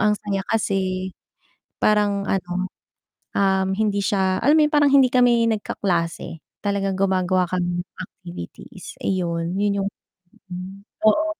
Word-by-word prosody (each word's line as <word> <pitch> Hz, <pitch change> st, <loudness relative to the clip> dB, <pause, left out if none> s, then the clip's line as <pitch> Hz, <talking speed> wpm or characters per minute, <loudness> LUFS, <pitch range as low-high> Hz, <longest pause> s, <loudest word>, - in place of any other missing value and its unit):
ang 210 Hz, -1 st, +4 dB
saya 200 Hz, -2 st, -2 dB
kasi 190 Hz, -3 st, -1 dB, 0.7 s
parang 205 Hz, -1 st, +2 dB
ano, 185 Hz, 0 st, -1 dB, 0.7 s
um, 190 Hz, -1 st, +3 dB
hindi 205 Hz, 0 st, 0 dB
siya 190 Hz, -2 st, +1 dB
alam 295 Hz, +4 st, +5 dB
mo -, -, +6 dB
yun 300 Hz, -, -10 dB
parang 290 Hz, -1 st, +5 dB
hindi 270 Hz, -2 st, +6 dB
kami 240 Hz, -2 st, +4 dB
nagkaklase, 170 Hz, -6 st, -2 dB, 0.2 s
talagang 200 Hz, -1 st, 0 dB
gumagawa 185 Hz, -1 st, +2 dB
kami 175 Hz, -1 st, -1 dB
ng -, -, -51 dB
activities. 175 Hz, -, -10 dB
ayun 170 Hz, -2 st, -1 dB
yun 200 Hz, -1 st, +1 dB
yung 200 Hz, -, -1 dB, 0.6 s
hmm, 185 Hz, +2 st, -7 dB, 0.2 s
oo. 310 Hz, +9 st, +4 dB
195 Hz, 130 wpm, -22 LUFS, 185-210 Hz, 0.7 s, mo